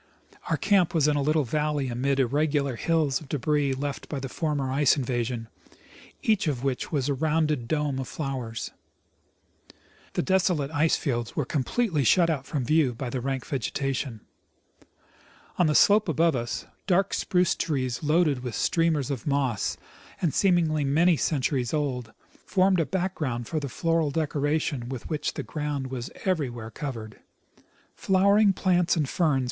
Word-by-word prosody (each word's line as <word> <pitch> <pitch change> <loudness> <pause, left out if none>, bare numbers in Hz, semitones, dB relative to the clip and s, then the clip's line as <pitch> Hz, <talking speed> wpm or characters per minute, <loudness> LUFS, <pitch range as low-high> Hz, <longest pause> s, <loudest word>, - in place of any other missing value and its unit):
Our - - +1
camp 190 -5 +2
was 155 -2 +4
in 150 - +2
a 145 - +1
little 155 +2 +2
valley 150 +1 -1
amid 135 +3 0
irregular 140 +1 +1
hills 155 0 +1
of 145 - -13
debris 145 -1 +1
left 140 +1 -4
by 145 - -3
the 135 0 -5
former 145 -3 -2
ice 140 +1 +3
invasion, 120 -3 -2 0.8
each 215 -6 +2
of 135 -4 -1
which 135 -2 -2
was 140 -4 0
a 145 - +1
rounded 150 -3 0
dome 150 -2 -1
of 130 - -4
flowers. 130 -6 -4 1.4
The - - 0
desolate 180 -6 +1
ice 160 +1 +2
fields 120 -5 -2
were 150 - 0
com 135 +1 -1
pletely 185 - 0
shut 170 +6 +4
out 140 -4 -3
from 140 -5 -2
view 150 -4 +2
by 125 0 -5
the 130 - -2
rank 135 0 -3
vegetation. 135 -3 -3 1.4
On 175 - +5
the 150 - +1
slope 205 -2 +5
above 165 0 +2
us, 120 -1 -3 0.2
dark 195 0 +2
spruce 180 -1 +2
trees 130 -6 -2
loaded 150 -3 +2
with 125 -3 -5
streamers 160 -5 +1
of 130 -2 -5
moss, 135 -7 0 0.4
and 165 -6 0
seemingly 170 -6 +2
many 165 +6 +3
centuries 135 -4 0
old, 130 -6 -2 0.3
formed 190 -1 +2
a 165 - +1
background 155 -11 -2
for 155 - -1
the 140 -2 -5
floral 165 +1 0
decoration 145 -3 -1
with 130 -3 -6
which 150 -1 -2
the - - -3
ground 145 -4 -4
was 125 -2 -4 0.2
everywhere 125 - -2
covered. 115 -5 -6 0.7
Flowering 200 +2 +4
plants 180 -2 +2
and 155 -4 0
ferns 160 +1 +1
w. 135 - +2
145 Hz, 160 wpm, -26 LUFS, 130-160 Hz, 1.4 s, On